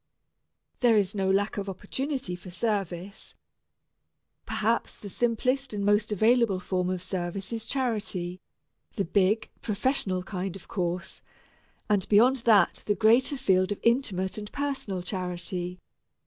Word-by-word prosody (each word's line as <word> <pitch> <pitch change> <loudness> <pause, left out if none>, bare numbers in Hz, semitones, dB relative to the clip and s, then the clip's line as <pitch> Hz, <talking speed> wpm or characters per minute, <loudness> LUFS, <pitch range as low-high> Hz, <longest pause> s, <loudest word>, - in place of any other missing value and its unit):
There 235 -3 +5
is 200 -2 +2
no 195 -2 0
lack 200 +2 +1
of 200 -1 -3
opportunity 250 +2 -3
for 180 +1 -11
service. 195 -1 -3 1.1
Perhaps - - 0
the 205 - -9
simplest 250 +3 0
and 200 -1 -1
most 205 +1 +3
available 220 -1 +3
form 180 0 -1
of 185 -1 -2
service 185 +3 -3
is 225 -1 -2
charity, 205 -9 -2 0.5
the 200 - -1
big, 200 +5 +2
professional 200 -4 0
kind, 190 -1 -4
of 195 - -11
course, 180 -1 -3 0.7
and 205 -3 +1
beyond 240 +6 +6
that 220 -6 +4
the 205 - +2
greater 235 +7 +4
field 190 -6 +2
of 205 - -2
intimate 215 -6 +1
and 210 0 -8
personal 270 -10 -3
charity. 180 -1 -4
200 Hz, 135 wpm, -28 LUFS, 185-225 Hz, 1.1 s, beyond